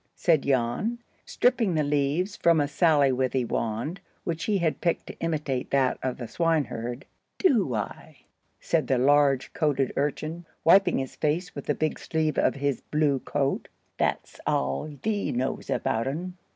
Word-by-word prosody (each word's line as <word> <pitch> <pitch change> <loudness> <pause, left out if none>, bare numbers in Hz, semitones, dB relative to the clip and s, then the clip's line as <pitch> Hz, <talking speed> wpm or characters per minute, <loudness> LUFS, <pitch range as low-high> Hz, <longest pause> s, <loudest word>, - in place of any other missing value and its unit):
said 160 -5 +3
Jan, 135 - 0 0.3
stripping 230 -7 +2
the 155 - +2
leaves 145 +7 0
from 170 -6 +3
a 145 - +2
sallywithy 135 -5 +2
wand, 115 - -2 0.2
which 165 -1 -3
he 210 -2 +2
had 170 -4 -1
picked 170 -2 0
to - - -10
imitate 150 -6 -2
that 135 -2 +2
of 130 -1 -2
the 120 - -6
swineherd. 135 -5 -1 0.3
"Do 220 - +2
I?" 105 - -5 0.4
said - - 0
the 130 - +2
large 140 0 +3
coated 140 -4 +1
urchin, 155 +4 -2 0.2
wiping 195 +4 +5
his 135 -1 -4
face 160 +4 -1
with 140 - -8
the 150 - +1
big 155 0 -1
sleeve 155 -2 -1
of - - +2
his 140 -2 -1
blue 150 -3 +1
coat. 140 +1 -1 0.3
"That's - - -1
aal 70 - -1
thee 210 -2 0
knows 125 +2 -2
about 115 +2 0
un. 175 +6 -4
145 Hz, 155 wpm, -26 LUFS, 130-165 Hz, 0.4 s, wiping